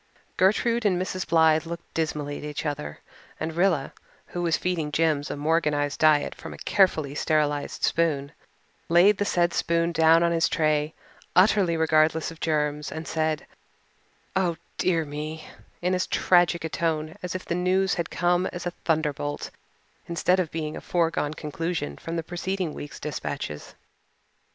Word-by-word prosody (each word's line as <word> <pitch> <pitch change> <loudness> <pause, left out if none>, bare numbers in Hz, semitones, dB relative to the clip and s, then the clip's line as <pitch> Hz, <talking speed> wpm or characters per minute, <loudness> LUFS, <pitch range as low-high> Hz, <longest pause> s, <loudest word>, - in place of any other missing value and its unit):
Gertrude 230 +5 +2
and 190 -4 +2
Mrs. 185 0 -3
Blythe 160 -1 +4
looked 170 0 -8
dismally 150 -2 -2
at - - -10
each 150 +1 -5
other, 75 - -4 0.4
and 160 +1 -3
Rilla, 170 -5 +1 0.3
who 175 - -5
was 170 -2 +2
feeding 165 -5 -2
Jims 155 -2 +1
a - - -4
Morganized 150 -2 0
diet 155 -2 +4
from - - -9
a - - -11
carefully 160 -8 +2
sterilized 150 -1 0
spoon, 150 -4 +1 0.6
laid 185 +4 +5
the 205 - +1
said 175 -3 +1
spoon 170 0 +1
down 165 +1 +5
on 170 - +2
his 165 -1 +2
tray, 155 0 +1 0.4
utterly 185 -2 +4
regardless 160 0 +2
of 165 - -12
germs, 150 -2 -1
and 160 0 -6
said, 155 -2 -1 0.9
"Oh, 180 -3 +1 0.2
dear 165 -3 +2
me," 150 +2 -6 0.4
in 180 +1 +2
as 185 0 0
tragic 175 -2 +3
a 160 - -2
tone 160 -1 -1
as 180 0 -4
if 185 - -5
the - - -2
news 185 +2 +2
had 170 -2 -2
come 175 +1 +1
as 175 0 -6
a 175 - -1
thunderbolt 150 -3 -1 0.6
instead 180 +2 +2
of 175 -4 0
being 155 -1 -4
a - - -7
foregone 165 -3 0
conclusion 155 - -3
from 165 - -6
the 165 - -2
preceding 175 0 -3
week's 145 - -8
dispatches. 145 - -5
165 Hz, 160 wpm, -26 LUFS, 150-175 Hz, 0.9 s, laid